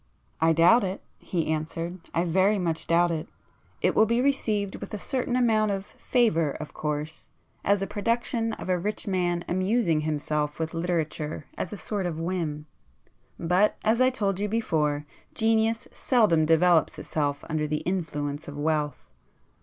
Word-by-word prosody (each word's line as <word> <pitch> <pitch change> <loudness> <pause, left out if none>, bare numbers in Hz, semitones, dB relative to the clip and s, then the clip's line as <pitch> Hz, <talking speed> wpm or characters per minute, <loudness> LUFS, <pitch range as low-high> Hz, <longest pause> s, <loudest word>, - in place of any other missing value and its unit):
"I 165 0 +4
doubt 170 +9 +6
it!" 190 0 -3 0.2
he 170 -4 -2
answered—"I 165 +2 -3
very 190 +4 +3
much 170 -4 -2
doubt 170 +1 +3
it. 160 -2 -3 0.6
It - - +3
will 220 - +4
be 235 +2 +2
received 220 -7 0
with - - -8
a - - -3
certain 250 +3 -2
amount 220 -4 +3
of 195 -1 -2
favour 165 - +1
of 155 - -8
course, 150 +1 -4 0.3
as 200 0 +2
a - - 0
production 230 +2 -1
of - - -7
a 180 -1 +1
rich 210 +4 -3
man 175 -3 0
amusing 185 -2 +1
himself 150 -1 -1
with 160 0 -3
literature 160 -3 -2
as - - -4
a 210 - -5
sort 195 -2 -2
of 160 -2 -4
whim. 165 -4 -2 0.7
But, 180 +5 +2
as 225 +3 +3
I 255 - +6
told 200 -7 -1
you 205 +1 -1
before, 150 -9 0 0.3
genius 225 0 +2
seldom 190 - +3
develops 165 0 +4
itself 145 -2 -2
under 155 -1 -1
the 150 0 -1
influence 150 -5 -3
of 145 0 -7
wealth. 150 -1 -1
175 Hz, 160 wpm, -26 LUFS, 155-210 Hz, 0.7 s, doubt